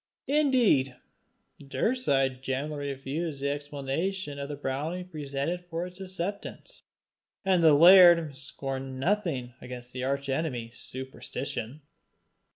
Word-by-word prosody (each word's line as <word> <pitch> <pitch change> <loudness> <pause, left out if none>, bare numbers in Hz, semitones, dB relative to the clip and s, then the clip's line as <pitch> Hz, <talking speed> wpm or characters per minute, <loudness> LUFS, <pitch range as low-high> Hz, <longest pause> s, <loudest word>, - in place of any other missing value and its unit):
Indeed 250 - +3 0.6
Daurside 135 - 0
generally 140 +2 -3
refused 140 +3 -4
the 140 +1 0
explanation 145 +3 -3
of 140 0 -5
the 145 - -4
brownie 145 +6 -3
presented 155 +1 -4
for 170 +1 -2
its 180 +1 -8
acceptance, 190 +1 -5 0.6
and 185 -3 +3
the 155 -2 +7
laird 170 -2 +8
scored 135 0 -5
nothing 135 -1 -1
against 125 0 -8
the 125 0 -4
arch 140 +1 -1
enemy 135 -5 -2
Superstition. 130 +1 -6
145 Hz, 110 wpm, -28 LUFS, 135-175 Hz, 0.6 s, laird